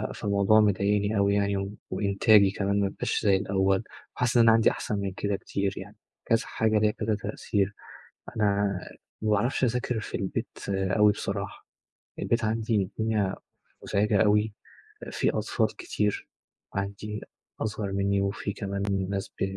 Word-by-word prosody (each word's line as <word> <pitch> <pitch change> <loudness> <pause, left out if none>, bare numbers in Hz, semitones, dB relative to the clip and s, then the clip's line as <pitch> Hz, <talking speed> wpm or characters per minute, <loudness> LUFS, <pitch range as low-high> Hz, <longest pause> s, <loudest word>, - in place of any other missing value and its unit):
فالموضوع 100 +1 +3
مضايقني 105 +1 +2
أوي 100 0 +3
يعني 100 0 -1
وإنتاجي 100 +1 +4
كمان 100 0 0
ما 100 -1 +1
بقاش 125 +4 -2
زي 100 -2 +5
الأول 95 +1 +1 0.3
وحاسس 125 -1 +1
إن - - +7
أنا 115 - +7
عندي 115 0 +5
أحسن 105 - -3
من 100 -1 -2
كده 100 +1 -1
كتير 100 0 -2
يعني، - - -9 0.3
كذا 115 0 +3
حاجة 110 -1 +1
ليها 105 0 +3
كذا 110 -1 -1
تأثير. 100 -1 -2 0.6
أنا 100 -2 +1 0.4
ما 110 - 0
باعرفش 105 +6 +1
أذاكر 125 -1 0
في - - -4
البيت 95 -2 -4
أوي 95 +2 +3
بصراحة، 100 -2 -5 0.5
البيت 115 -1 0
عندي 110 0 0
الدنيا 105 0 -1 0.5
مُزعجة 105 +1 +2
أوي، 105 0 +3 0.6
في - - +1
أطفال - - -1
كتير 105 -1 -2 0.5
عندي 100 +2 -4 0.4
أصغر 105 -2 -2
منّي 100 0 +1
وفي 100 +1 -2
كمان 100 -1 -4 0.3
ناس 100 -1 -2
ب - - -8
100 Hz, 145 wpm, -27 LUFS, 100-110 Hz, 0.6 s, إن